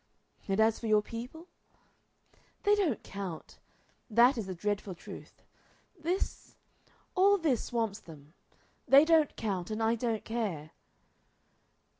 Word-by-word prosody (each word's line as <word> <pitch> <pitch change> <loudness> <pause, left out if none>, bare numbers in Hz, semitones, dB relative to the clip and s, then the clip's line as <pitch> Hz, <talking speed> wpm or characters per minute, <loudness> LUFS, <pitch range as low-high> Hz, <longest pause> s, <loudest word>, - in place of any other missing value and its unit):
"And 195 +1 0
as 220 0 +3
for 230 - -5
your 215 -1 +4
people?" 245 +10 -8 1.2
"They 410 - +4
don't 370 - +1
count. 195 -5 -7 0.5
That 240 +4 +5
is 220 -5 -4
the 185 - -5
dreadful 205 0 -3
truth. - - -12 0.5
This 350 +2 -3 0.6
all 400 +2 +5
this 300 - 0
swamps 225 -3 -2
them. 155 -5 -14 0.5
They 280 +3 +8
don't 320 -3 +3
count, 190 -5 -3
and 220 +1 -2
I 225 +1 +3
don't 230 -2 -2
care." 200 -10 -3
225 Hz, 125 wpm, -31 LUFS, 200-280 Hz, 1.2 s, They